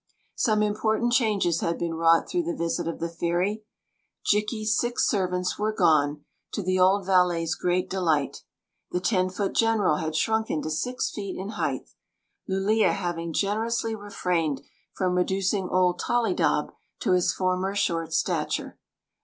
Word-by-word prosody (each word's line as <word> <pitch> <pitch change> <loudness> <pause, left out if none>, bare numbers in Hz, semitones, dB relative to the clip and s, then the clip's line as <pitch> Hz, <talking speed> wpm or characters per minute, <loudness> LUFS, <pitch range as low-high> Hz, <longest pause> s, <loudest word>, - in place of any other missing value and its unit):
Some 215 -3 +2
important 215 +3 +1
changes 210 -9 +2
had 170 0 -1
been 170 -1 -2
wrought 165 0 +3
through 355 - 0
the 340 -1 -2
visit 170 -2 -2
of 165 - -4
the 170 - -1
fairy, 175 +6 -1 0.6
Jikki 210 +1 +1
s 215 0 +2
six 240 +2 +1
servants 180 -3 -1
were 215 +1 +1
gone, 150 -6 +2 0.3
to 205 - -2
the 185 +1 +1
oM 190 +1 +4
valet's 180 -3 +2
great 180 +2 0
delight 165 -7 0 0.5
The 180 - -1
ten 185 -1 +1
foot 195 +1 -2
general 220 -8 +2
had 160 0 -3
shrunken 220 -3 0
to 155 - -3
six 250 +11 -2
feet 200 -3 -5
in 190 +2 -5
height, 215 - -3 0.6
Lulea 200 +3 +2
having 175 -3 -3
gen 200 +5 0
erously 225 0 -1
refrained 175 -8 -2 0.3
from 185 -1 0
reducing 190 +1 0
old 180 -1 +2
Tollydob 240 +8 +1 0.3
to - - +1
his 180 -1 +3
former 185 +1 -1
short 165 -4 0
stature. - - -1
185 Hz, 155 wpm, -26 LUFS, 170-215 Hz, 0.6 s, oM